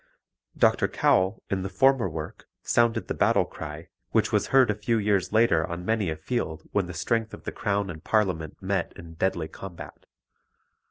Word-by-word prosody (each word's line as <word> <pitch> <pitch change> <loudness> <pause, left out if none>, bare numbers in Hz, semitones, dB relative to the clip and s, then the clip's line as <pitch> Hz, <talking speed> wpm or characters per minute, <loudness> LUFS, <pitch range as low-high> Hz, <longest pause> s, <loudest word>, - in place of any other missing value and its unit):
Dr. - - +3
Cowell, 95 +3 +2
in 95 -1 0
the 95 - -3
former 125 +1 +3
work, 80 -1 -7 0.2
sounded 115 -1 +2
the - - -2
battle - - +3
cry 75 +2 -8 0.2
which - - +1
was - - +1
heard 130 -4 +5
a - - 0
few 105 +3 0
years 100 -3 +1
later 110 -7 +4
on 85 0 -6
many 110 -4 +1
a 80 - -2
field 80 -1 -3
when 100 -3 0
the 90 - -7
strength 115 +7 -1
of - - -17
the - - -4
Crown 100 -2 -1
and 80 0 -10
Parliament 90 -8 0
met 95 -2 -1
in 85 -1 -11
deadly 85 -1 -1
combat. 90 +1 -10
95 Hz, 180 wpm, -26 LUFS, 85-110 Hz, 0.2 s, heard